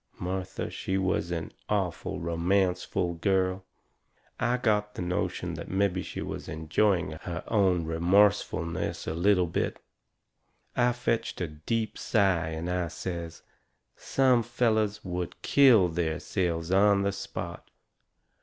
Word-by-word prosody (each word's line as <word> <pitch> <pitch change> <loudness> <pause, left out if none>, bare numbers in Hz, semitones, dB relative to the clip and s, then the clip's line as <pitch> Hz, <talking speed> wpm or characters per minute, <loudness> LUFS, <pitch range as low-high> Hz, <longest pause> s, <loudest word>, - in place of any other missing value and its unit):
Martha, 95 +1 -4
she 95 - -2
was 95 -2 0
an 85 -2 -3 0.2
awful 95 -5 -1
romanceful 90 +1 0
girl. 95 0 +1 0.8
I 120 +1 +1
got 105 -4 0
the - - -4
notion 90 0 -2
that - - -7
mebby 95 0 +1
she - - -5
was - - -6
enjoying 80 +4 +1
her 85 -1 -5
own 95 -6 +2
remorsefulness 85 0 +1
a - - -2
little 90 +2 +3
bit. 85 - -2 1.0
I 125 0 +3
fetched 115 -2 -1
a 90 - -1
deep 105 +9 -3
sigh 95 -7 +2
and 80 +1 -4
I 90 -1 -1
says: 85 0 -6 0.5
"Some 130 -3 +3
fellers 110 -3 0
would 90 -1 -4
kill 125 -10 +6
theirselves 85 +1 -2
on 100 +1 +4
the 100 - +1
spot!" 95 - -6
95 Hz, 125 wpm, -28 LUFS, 85-105 Hz, 1.0 s, kill